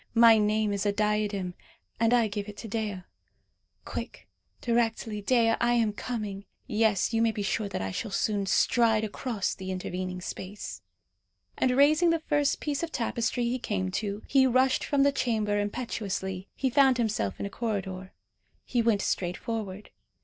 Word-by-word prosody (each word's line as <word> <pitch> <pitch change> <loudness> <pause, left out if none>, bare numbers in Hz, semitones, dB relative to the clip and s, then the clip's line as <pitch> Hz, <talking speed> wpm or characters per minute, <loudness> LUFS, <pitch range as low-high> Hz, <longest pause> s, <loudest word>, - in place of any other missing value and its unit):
My 230 -1 +7
name 210 0 +1
is 200 - -1
a - - +3
diadem, 210 -3 0 0.5
and 230 0 +3
I 240 -2 +4
give 205 0 -4
it 205 - -10
to 225 - -7
Dea. 210 -3 -3 0.8
Quick, - - -6 0.3
directly, 225 -2 0
Dea, 230 +1 +3
I 240 0 +3
am 225 -3 +2
coming; 210 -3 -5 0.2
yes, 215 -1 +1
you 225 - +2
may 230 - +4
be 210 -2 -4
sure 200 +1 -1
that 180 - -3
I 95 - -3
shall 220 - -4
soon 200 0 0
stride 225 +1 +3
across 215 -1 -2
the 190 0 -7
intervening 185 0 -4
space!" 190 +2 -7 0.7
And 255 0 +1
raising 310 +5 +5
the 330 - +3
first 290 -2 0
piece 285 -2 -2
of 335 -1 -3
tapestry 235 +1 -1
he 240 +2 0
came 185 -5 -2
to, 205 0 -4
he 265 -1 +4
rushed 255 +1 +3
from 285 -2 +2
the 280 - +4
chamber 215 -6 0
impetuously. 200 -4 -3
He 265 -2 0
found 265 -1 +5
himself 215 - -1
in - - -3
a 200 - -5
corridor. 190 -4 -4 0.5
He 245 - +1
went 225 -4 +2
straight 180 -1 -1
forward. 210 -3 -5
215 Hz, 170 wpm, -28 LUFS, 200-240 Hz, 0.8 s, My